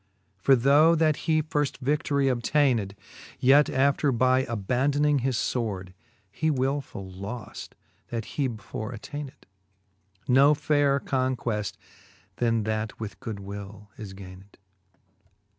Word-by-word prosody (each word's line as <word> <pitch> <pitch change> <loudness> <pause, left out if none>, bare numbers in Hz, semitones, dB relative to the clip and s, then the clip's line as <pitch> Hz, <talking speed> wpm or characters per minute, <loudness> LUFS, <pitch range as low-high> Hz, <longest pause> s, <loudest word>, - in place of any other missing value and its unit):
For 115 +8 +4
though 145 +6 +5
that 155 -2 +3
he 155 -1 +3
firft 145 -2 -1
vi6i:orie 140 +1 0
obtayned, 120 -5 +1 0.5
Yet 140 +3 +5
after 140 +1 +2
by 130 +2 +2
abandoning 135 +7 +1
his 130 -1 -1
fword, 100 -9 -2 0.4
He 160 +9 -1
wiifull 130 -9 -2
loft, 105 +2 -7 0.3
that 115 -2 -4
he 140 -3 -1
before 110 +1 -6
attayned. 140 +4 -8 0.8
Ko 140 +4 +5
fayrer 145 -1 +2
conqueft 125 -5 -2 0.6
then 115 -2 +1
that 110 0 -3
with 110 -2 -7
goodwill 100 -1 -8
is 100 -3 -8
gayned. 95 +1 -13
130 Hz, 110 wpm, -26 LUFS, 105-140 Hz, 0.8 s, though